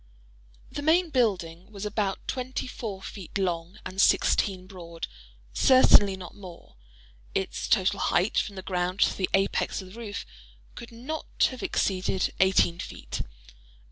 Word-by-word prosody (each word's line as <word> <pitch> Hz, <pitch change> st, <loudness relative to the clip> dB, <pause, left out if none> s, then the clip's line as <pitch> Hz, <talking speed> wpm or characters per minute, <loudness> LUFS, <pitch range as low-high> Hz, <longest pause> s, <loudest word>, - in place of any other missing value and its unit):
The -, -, -4 dB
main 325 Hz, +3 st, +3 dB
building 190 Hz, -, 0 dB
was 200 Hz, -1 st, -6 dB
about 205 Hz, -2 st, -2 dB
twenty 255 Hz, 0 st, -3 dB
four 210 Hz, -6 st, -6 dB
feet 195 Hz, -1 st, -7 dB
long 175 Hz, 0 st, -2 dB
and 190 Hz, +1 st, -1 dB
sixteen 185 Hz, -3 st, +3 dB
broad—certainly 165 Hz, -, +2 dB
not 180 Hz, -2 st, -9 dB
more. 180 Hz, -4 st, -12 dB, 0.6 s
Its 190 Hz, -, -2 dB
total 200 Hz, -1 st, +2 dB
height, 185 Hz, +5 st, +2 dB
from 205 Hz, -, -3 dB
the 190 Hz, -, -7 dB
ground 180 Hz, +1 st, -1 dB
to -, -, +4 dB
the 185 Hz, -, -1 dB
apex 195 Hz, 0 st, 0 dB
of 185 Hz, -1 st, -9 dB
the 230 Hz, -, -10 dB
roof, 210 Hz, -3 st, -5 dB, 0.5 s
could 235 Hz, -, -10 dB
not 265 Hz, +7 st, -1 dB
have 255 Hz, -, -8 dB
exceeded 190 Hz, -1 st, 0 dB
eighteen 185 Hz, -2 st, +4 dB
feet. -, -, -5 dB
195 Hz, 140 wpm, -27 LUFS, 180-220 Hz, 0.6 s, to